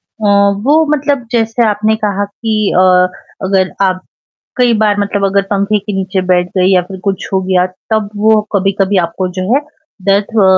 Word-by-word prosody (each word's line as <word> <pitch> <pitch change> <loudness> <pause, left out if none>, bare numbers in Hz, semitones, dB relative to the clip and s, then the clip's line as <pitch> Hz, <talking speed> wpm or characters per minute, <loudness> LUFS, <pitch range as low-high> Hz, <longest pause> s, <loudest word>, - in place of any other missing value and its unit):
अ, 215 - -7 0.4
वो 310 +3 +4
मतलब 280 -3 -2
जैसे 230 0 +1
आपने 215 +1 +1
कहा 205 0 0
कि 220 +2 -4 0.2
अ, - - +5 0.6
अगर 190 -1 +1
आप 185 -1 0 0.6
कई 245 -2 +3
बार 210 -1 +2
मतलब 200 0 -1
अगर 200 0 +1
पंखे 200 +1 +1
के 205 +1 -6
नीचे 190 0 -1
बैठ 180 0 +2
गई 180 - +3
या 180 - +4
फ़िर 190 +1 -9
कुछ 195 -1 -2
हो 190 - +2
गया। 185 -1 +1 0.2
तब 215 -2 0
वो 220 0 +4
कभी-कभी 195 0 +1
आपको 185 +2 -4
जो - - -1
है 285 - +3 0.5
दर्द 200 +1 +3
ह 195 - +5
200 Hz, 180 wpm, -13 LUFS, 190-220 Hz, 0.6 s, अ